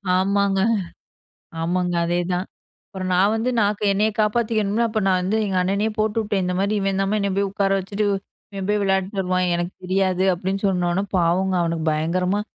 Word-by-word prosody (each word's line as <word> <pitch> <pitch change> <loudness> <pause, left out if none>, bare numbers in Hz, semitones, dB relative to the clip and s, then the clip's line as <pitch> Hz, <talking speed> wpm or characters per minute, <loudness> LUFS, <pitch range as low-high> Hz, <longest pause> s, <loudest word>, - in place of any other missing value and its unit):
ஆமாங்க. 195 +1 +2 1.0
ஆமாங்க, 180 +1 0
அதேதான். 175 +1 -1 0.4
அப்பறம் 185 -2 -5
நான் 195 +4 +3
வந்து 225 +3 0
நான் 210 -1 +2
கு - - -4
என்ன 205 +2 +1 0.2
காப்பாத்திக்கணுமல? 215 0 +1
அப்ப 215 0 -1
நான் 185 -1 +3
வந்து 195 +4 0
எங்க 190 -2 -2
அண்ணனையே 200 +4 0
போட்டுவுட்டேன். 215 -2 0
இந்த 180 0 -1
மாரி 200 +2 +1
இவன்தாம்மா, 195 +1 0
என்னை 200 -1 0
போய் 200 0 +1
உட்கார 200 0 0
வச்சுட்டு, 205 +2 -2 0.5
இவன் 195 0 -5
போய் 210 0 +1
விளையாடிட்டு 195 +1 0
வருவான். 185 -1 0
எனக்கு 175 +1 -2
தெரியாது 185 0 +1
அப்டின்னு 190 +3 -3
சொன்னோன, 180 +1 0
பாவம்ங்க 180 +2 +2
அவனுக்கு 165 -1 -2
பயங்கரமா 180 +6 0
195 Hz, 165 wpm, -22 LUFS, 180-205 Hz, 1.0 s, நான்